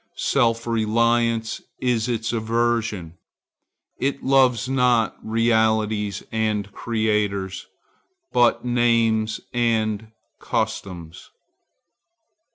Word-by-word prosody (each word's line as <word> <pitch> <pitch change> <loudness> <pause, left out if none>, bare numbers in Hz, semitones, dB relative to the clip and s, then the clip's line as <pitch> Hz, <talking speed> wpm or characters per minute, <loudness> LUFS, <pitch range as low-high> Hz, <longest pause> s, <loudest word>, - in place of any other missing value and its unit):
Self 115 -1 +1
reliance 115 0 +1 0.2
is 125 -2 0
its 115 -1 -2
aversion. 115 -6 -1 0.8
It 140 +1 -1
loves 130 -3 +3
not 125 -4 +2
realities 110 -3 +1
and 105 -2 -1
creators, 105 -4 -1 0.7
but 120 0 +3
names 115 -2 +1
and 110 -3 0 0.3
customs. 85 -4 -4
115 Hz, 70 wpm, -23 LUFS, 110-120 Hz, 0.8 s, loves